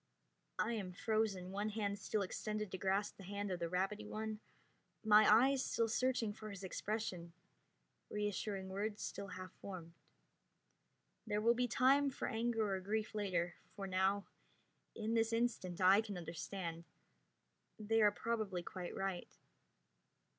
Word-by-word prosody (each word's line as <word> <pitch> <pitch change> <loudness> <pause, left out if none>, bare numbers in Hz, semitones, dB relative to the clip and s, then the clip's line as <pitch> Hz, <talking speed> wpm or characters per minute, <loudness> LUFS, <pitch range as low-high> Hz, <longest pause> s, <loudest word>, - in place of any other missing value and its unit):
I 235 - +1
am 195 -5 -3
frozen, 200 -3 0
one 205 +2 -1
hand 205 -2 -2
still 205 0 0
extended 215 +1 -3
to 190 - -3
grasp 195 +2 0
the 195 - -10
hand 200 +1 -3
of 180 - -2
the 170 -1 -1
rabbity 190 +4 -1
one, 215 0 -3 0.6
my 215 -1 +7
eyes 260 +4 +6
still 230 - +1
searching 230 -1 +1
his 205 -2 -8
expression, 190 -3 -3 0.8
reassuring 205 -1 -2
words 205 +2 -2
still 200 - -4
half 185 -1 -7
formed. 175 -4 -7 1.3
There 210 -1 +1
will 230 +2 +5
be 245 +1 +1
time 275 +4 +4
for 265 - -3
anger 225 -2 0
or 190 - 0
grief 210 +3 -2
later, 180 -5 0 0.2
for 200 -2 -4
now, 190 +1 +2 0.7
in 220 0 -1
this 225 0 +3
instant, 225 -7 0
I 190 +3 +7
can 210 -4 -5
understand. 170 0 -5 0.9
They 225 +1 +2
are 210 -1 +7
probably 210 -5 -2
quite 180 0 -6
right. 195 -2 -3
205 Hz, 140 wpm, -38 LUFS, 190-220 Hz, 1.3 s, my